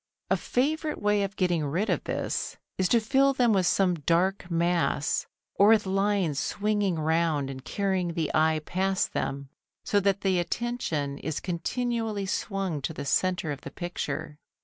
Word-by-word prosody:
A - - +6
favourite 305 +4 -1
way 210 0 +2
of 195 -1 -2
getting 175 -4 +1
rid 170 +9 -1
of - - 0
this - - -2 0.2
is 185 - +2
to 235 - +5
fill 270 +5 +3
them 245 -4 +3
with 185 -3 +2
some 185 0 +3
dark 175 +4 0
mass, 170 -3 +1 0.3
or 200 - +5
with 220 -1 +5
lines 195 -6 +1
swinging 205 -3 0
round 160 -3 +1
and 130 -1 -8
carrying 190 -3 -1
the 160 -3 -1
eye 155 0 +3
past 190 +1 0
them, 140 0 -3 0.4
so 205 - +3
that 200 0 +1
the 190 -2 +2
attention 170 - -2
is 155 -1 -3
continually 220 +3 -2
swung 190 -5 -2
to 160 - -3
the 140 - -5
centre 180 +1 +1
of 140 - -5
the - - -7
picture. 160 -2 -5
185 Hz, 165 wpm, -27 LUFS, 160-205 Hz, 0.4 s, A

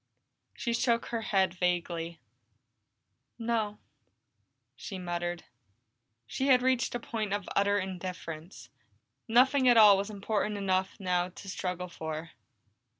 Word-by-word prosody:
She 235 - -2
shook 235 0 +1
her 230 -1 -2
head 190 -4 +1
vaguely. 170 -2 -1 1.2
"No," 225 -3 -1 1.0
she 195 - -7
muttered. 175 -1 -3 0.8
She 265 - -2
had 250 -2 +5
reached 255 -2 +1
the 240 - -2
point 215 -3 -3
of 205 -2 -3
utter 200 0 +3
indifference; 180 -3 -6 0.6
nothing 260 +3 +4
at 240 - +6
all 210 -3 +9
was 200 +2 -3
important 210 0 -2
enough 190 0 0
now 180 -2 0
to 190 +2 -12
struggle 180 -1 -3
for. 160 -1 -6
195 Hz, 120 wpm, -30 LUFS, 180-225 Hz, 1.2 s, all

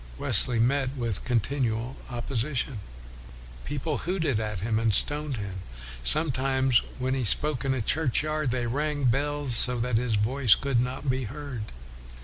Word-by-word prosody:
Wesley 120 - +5
met 135 +3 0
with 115 -5 -3
continual 120 0 -1
opposition. 120 +1 -3 0.9
People 145 +1 -3
hooted 160 - -1
at 105 -4 -4
him, 110 +1 -1
and 115 -1 +1
stoned 145 +5 -1
him. 100 -3 -6 0.4
Sometimes 130 - +2 0.2
when 130 0 -2
he 135 -1 -1
spoke 140 +4 +2
in 135 -1 0
a 120 - -3
churchyard, 155 +2 0
they 120 0 -2
rang 145 +4 -2
the 130 - +2
bells 145 -1 +2
so 125 +1 +7
that 120 -1 0
his 115 -2 -1
voice 115 +2 +3
could 135 -3 -1
not 125 +3 -3
be 130 -1 -1
heard. 130 -2 -7
130 Hz, 150 wpm, -26 LUFS, 115-140 Hz, 0.9 s, so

